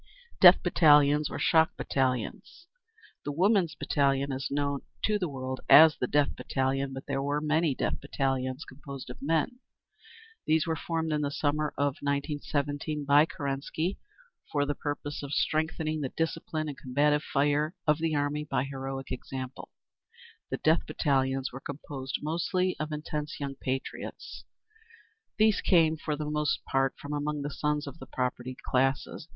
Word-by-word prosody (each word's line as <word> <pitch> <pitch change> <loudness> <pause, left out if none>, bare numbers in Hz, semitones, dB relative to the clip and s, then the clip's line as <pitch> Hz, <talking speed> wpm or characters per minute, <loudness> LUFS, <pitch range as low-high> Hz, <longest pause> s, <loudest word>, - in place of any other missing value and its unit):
Death 180 0 +9
Battalions. 150 -4 +5
Or - - -5
Shock 160 +1 +3
Battalions. 130 - -2 0.6
The 145 - -3
Women's 180 0 +2
Battalion 140 -1 +1
is 135 0 -3
known 140 0 -1 0.2
to 210 -1 +2
the 180 -4 -1
world 130 -1 -5
as 155 0 +9
the 125 - -2
Death 145 +1 +2
Battalion, 135 0 -1
but 135 0 -7
there 135 -1 -2
were 145 +1 0
many 155 -1 +1
Death - - -2
Battalions 135 -1 -2
composed 135 -1 -9
of - - -12
men. 165 - 0 0.9
These 160 0 +3
were 165 -1 0
formed 160 0 -2
in 150 - 0
the 145 - 0
summer 150 +1 0
of 140 -1 0
1917 145 +1 -2
by 145 +2 +6
Kerensky, 150 +4 -3 0.5
for 145 -1 +1
the 145 - -1
purpose 145 0 -4
of 140 0 -6
strengthening 155 0 0
the 135 - -2
discipline 160 0 -2
and 145 - -5
combative 145 +3 +2
fire 150 +4 +1
of 150 -1 +3
the 160 -1 0
army 145 +1 0
by 135 -4 -1
heroic 135 -1 -5
example. 130 0 -6 0.8
The - - -2
Death 160 +2 +2
Battalions 135 -2 0
were 135 - -7
composed 140 -1 -6
mostly 175 +4 0
of 155 0 -3
intense 150 0 -4
young 140 -1 -3
patriots. 135 0 -5 0.9
These 215 -1 +4
came 165 -4 +4
for 155 -1 -3
the 150 +1 -4
most 150 0 -1
part 135 0 +1
from 145 +1 -6
among 145 0 -2
the 145 - -3
sons 150 0 -1
of 140 - -9
the 130 - -10
propertied 125 0 -3
classes. 135 +4 0
145 Hz, 155 wpm, -29 LUFS, 135-155 Hz, 0.9 s, Death